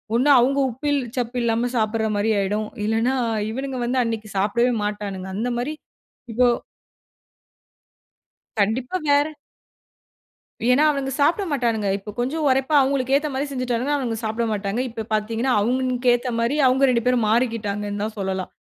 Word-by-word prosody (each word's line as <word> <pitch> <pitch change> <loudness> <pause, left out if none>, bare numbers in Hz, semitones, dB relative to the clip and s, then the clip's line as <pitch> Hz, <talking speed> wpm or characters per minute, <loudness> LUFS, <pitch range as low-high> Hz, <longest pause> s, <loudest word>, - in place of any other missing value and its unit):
ஒண்ணு, 265 +5 +3
அவுங்க 275 +3 +2
உப்பில் 285 +4 -1 0.2
சப்பு 245 0 -2
இல்லாம 230 +1 +1
சாப்பிடுற 220 0 0
மாரி 220 +2 +1
ஆயிடும். 210 +2 -1 0.2
இல்லைனா 225 +4 +1 0.4
இவனுங்க 265 +2 -4
வந்து 255 +2 0
அன்னைக்கு 220 -2 -4
சாப்பிடவே 235 +5 +2
மாட்டானுங்க, 205 -2 -4
அந்த 230 +4 -1
மாரி 280 +6 -2 0.6
இப்போ 245 +2 +3 2.1
கண்டிப்பா 240 - 0
வேற. 285 +1 +4 1.4
ஏன்னா 250 +4 +4
அவனுங்க 275 -2 -2
சாப்ட 330 +8 +3
மாட்டானுங்க. 230 -7 0
இப்போ 210 +2 -9
கொஞ்சம் 300 +5 -1
உரைப்பா 265 +3 +1
அவுங்களுக்கு 265 -1 0
ஏத்த 300 +1 0
மாரி 270 +2 -1
செஞ்சுட்டாங்கன்னா, 255 +2 -1
அவனுங்க 240 -5 -2
சாப்ட 220 +2 -1
மாட்டாங்க. 205 +2 -2
இப்போ 225 -1 -5
பாத்தீங்கன்னா 225 +4 0
அவுங்களுக்கேத்த 250 +1 +1
மாரி 235 +5 +1
அவுங்க 265 +2 +4
2 235 -2 +1
பேரும் 245 -3 +2
மாறிக்கிட்டாங்கன்னு 210 -3 -1
தான் 220 - -4
சொல்லலாம். 190 -1 -3
240 Hz, 140 wpm, -22 LUFS, 215-265 Hz, 2.1 s, வேற